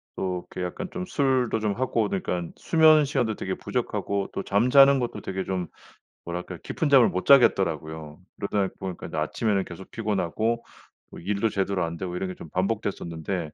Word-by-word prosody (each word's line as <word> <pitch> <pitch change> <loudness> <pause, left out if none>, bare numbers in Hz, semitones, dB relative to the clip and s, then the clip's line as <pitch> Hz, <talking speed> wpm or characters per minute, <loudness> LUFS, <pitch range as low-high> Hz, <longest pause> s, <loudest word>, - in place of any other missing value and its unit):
또 90 -1 -3
이렇게 90 - -2
약간 180 - -5
좀 185 -1 -4
술도 130 -8 +1
좀 105 -2 0
하고 115 -3 0
그러니깐 90 -3 -3
수면 155 -2 +5
시간도 115 -6 0
되게 95 - -3
부족하고 100 -1 -2
또 - - -3
잠자는 135 +6 +5
것도 120 -1 -3
되게 95 0 -3
좀 90 -3 -3 0.6
뭐랄까 90 +1 -5
깊은 160 - -1
잠을 135 -4 +7
못 95 - -3
자겠더라고요. 80 - +3 0.2
그러다 100 -1 -1
보니까 95 -2 -6
아침에는 95 +6 0
계속 90 +2 -10
피곤하고 110 +2 -1 0.5
뭐 - - -10
일도 100 +4 0
제대로 100 -2 -1
안 85 0 -3
되고 90 0 -4
이런 95 0 -2
게 90 - -6
좀 80 - -11
반복됐었는데 90 -3 -2
100 Hz, 375 characters per minute, -26 LUFS, 90-115 Hz, 0.6 s, 잠을